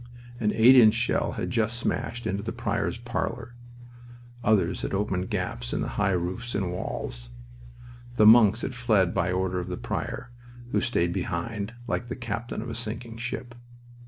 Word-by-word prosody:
An 105 Hz, -2 st, +2 dB
eight 120 Hz, +4 st, +8 dB
inch 115 Hz, -3 st, +7 dB
shell 120 Hz, +1 st, 0 dB
had -, -, -3 dB
just 115 Hz, 0 st, +1 dB
smashed 120 Hz, 0 st, -2 dB
into 100 Hz, +1 st, -1 dB
the 110 Hz, +2 st, -4 dB
prior's -, -, -2 dB
parlor. 120 Hz, -, -4 dB, 0.9 s
Others 95 Hz, -4 st, +2 dB
had -, -, -2 dB
opened 95 Hz, -2 st, -1 dB
gaps -, -, -3 dB
in -, -, -1 dB
the -, -, -2 dB
high 105 Hz, -1 st, 0 dB
roofs 95 Hz, +7 st, -3 dB
and 95 Hz, -3 st, -1 dB
walls. -, -, -4 dB, 0.9 s
The 110 Hz, -, +5 dB
monks 110 Hz, 0 st, +7 dB
had 130 Hz, -, -2 dB
fled 110 Hz, -7 st, +2 dB
by 90 Hz, +1 st, +1 dB
order 95 Hz, 0 st, 0 dB
of 90 Hz, -, -5 dB
the 90 Hz, -1 st, -4 dB
prior, 120 Hz, -, -4 dB, 0.4 s
who -, -, +2 dB
stayed 85 Hz, -8 st, +1 dB
behind, 100 Hz, +4 st, -3 dB
like 120 Hz, 0 st, -2 dB
the 120 Hz, -, -4 dB
captain 115 Hz, -2 st, -4 dB
of 120 Hz, -, -6 dB
a -, -, -4 dB
sinking 115 Hz, 0 st, -5 dB
ship. 120 Hz, +1 st, -5 dB
110 Hz, 170 wpm, -27 LUFS, 95-120 Hz, 0.9 s, eight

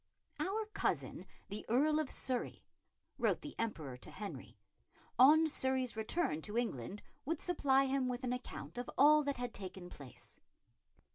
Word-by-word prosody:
"Our 425 Hz, +4 st, -1 dB
cousin, -, -, -1 dB, 0.2 s
the 205 Hz, +2 st, -5 dB
Earl 300 Hz, +6 st, +4 dB
of 305 Hz, -3 st, -1 dB
Surrey," 255 Hz, -2 st, -2 dB, 0.5 s
wrote -, -, +2 dB
the 295 Hz, -, -7 dB
Emperor 160 Hz, -, -3 dB
to -, -, -9 dB
Henry, 205 Hz, -2 st, -7 dB, 0.6 s
on 310 Hz, +5 st, +8 dB
Surrey's 260 Hz, -4 st, 0 dB
return 220 Hz, -, 0 dB
to 210 Hz, +7 st, -4 dB
England, 200 Hz, -, -2 dB, 0.2 s
would 315 Hz, +2 st, -1 dB
supply 275 Hz, -6 st, +3 dB
him 265 Hz, -1 st, +1 dB
with 250 Hz, +1 st, -3 dB
an 250 Hz, -1 st, 0 dB
account 250 Hz, -1 st, -6 dB
of 245 Hz, -, -4 dB
all 300 Hz, +3 st, +7 dB
that 280 Hz, -2 st, -2 dB
had 245 Hz, -1 st, -4 dB
taken 185 Hz, -2 st, -7 dB
place. 135 Hz, -4 st, -11 dB
255 Hz, 150 wpm, -36 LUFS, 210-290 Hz, 0.6 s, on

